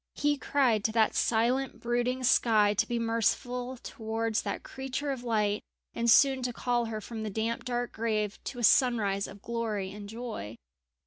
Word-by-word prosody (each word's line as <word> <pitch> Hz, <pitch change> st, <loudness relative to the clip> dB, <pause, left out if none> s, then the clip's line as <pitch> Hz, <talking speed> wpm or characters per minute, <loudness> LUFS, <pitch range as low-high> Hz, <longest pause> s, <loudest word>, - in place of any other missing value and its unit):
He 290 Hz, 0 st, +2 dB
cried 255 Hz, -6 st, +1 dB
to 220 Hz, -, +2 dB
that 220 Hz, -2 st, +3 dB
silent 245 Hz, +4 st, +1 dB
brooding 245 Hz, +2 st, -1 dB
sky 215 Hz, -4 st, +4 dB
to 205 Hz, -, +1 dB
be 240 Hz, -, -1 dB
merciful 245 Hz, +2 st, -1 dB
towards 225 Hz, -1 st, -2 dB
that -, -, -4 dB
creature 270 Hz, +2 st, -4 dB
of 260 Hz, -3 st, -5 dB
light 210 Hz, -3 st, +1 dB, 0.3 s
and 235 Hz, 0 st, 0 dB
soon 265 Hz, +2 st, +6 dB
to 250 Hz, 0 st, -1 dB
call 240 Hz, 0 st, 0 dB
her 220 Hz, -1 st, -4 dB
from 220 Hz, +1 st, -7 dB
the 215 Hz, -, -3 dB
damp 225 Hz, +3 st, -2 dB
dark 245 Hz, -1 st, -2 dB
grave 215 Hz, -2 st, -2 dB
to 250 Hz, -, -5 dB
a 240 Hz, -, -4 dB
sunrise 215 Hz, -6 st, +3 dB
of 200 Hz, +1 st, -12 dB
glory 220 Hz, -5 st, -2 dB
and 205 Hz, 0 st, -9 dB
joy. 220 Hz, -, -6 dB
230 Hz, 175 wpm, -29 LUFS, 215-245 Hz, 0.3 s, soon